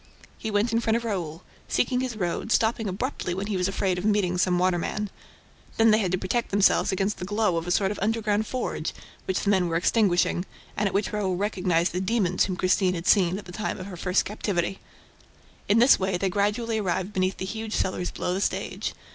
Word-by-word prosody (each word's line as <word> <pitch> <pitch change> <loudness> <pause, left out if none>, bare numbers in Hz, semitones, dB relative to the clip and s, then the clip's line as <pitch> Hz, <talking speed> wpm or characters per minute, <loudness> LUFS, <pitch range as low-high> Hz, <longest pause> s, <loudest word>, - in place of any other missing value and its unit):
He 220 - -3
went 215 +3 +1
in 230 - +3
front 225 -1 +1
of 235 - -5
Raoul, 175 -6 -3 0.2
seeking 250 0 +1
his 255 -3 -2
road, 185 +3 -2
stopping 225 -2 +2
abruptly 190 -2 -3
when 195 +2 -3
he 205 -1 -2
was 180 0 +1
afraid 190 -2 0
of - - -6
meeting 200 -4 +1
some 180 -1 +2
waterman. 185 +3 0 0.7
Then 225 0 +5
they 215 - +4
had 190 -5 0
to 185 - +1
protect 210 +6 -1
themselves 200 0 +3
against 195 +2 -1
the - - -5
glow 205 -1 +1
of 165 +1 -3
a - - -2
sort 195 +2 +2
of 210 - -5
underground 215 0 0
forge, 255 - -3 0.3
which 190 - -1
the 205 - +1
men 185 -3 +2
were 165 - -2
extinguishing, 180 -1 +2 0.3
and 210 - +1
at - - -3
which 200 +1 0
Raoul 195 -3 0
recognized 180 -3 +1
the 180 - -1
demons 190 -3 +1
whom 185 - -3
Christine 185 0 +2
had 170 0 -5
seen 185 -3 +4
at 205 - -8
the 180 - -10
time 210 +4 -3
of 185 - -7
her 195 -2 -7
first 180 +2 +1
captivity. 195 -3 -2 0.9
In 205 - +5
this 245 +4 +6
way, 190 -1 0
they 195 +1 0
gradually 210 +4 0
arrived 190 0 -2
beneath 185 0 0
the 190 - -4
huge 220 +2 -4
cellars 180 -1 -1
below 180 - -3
the 190 - -1
stage. - - -2
195 Hz, 220 wpm, -26 LUFS, 180-215 Hz, 0.9 s, this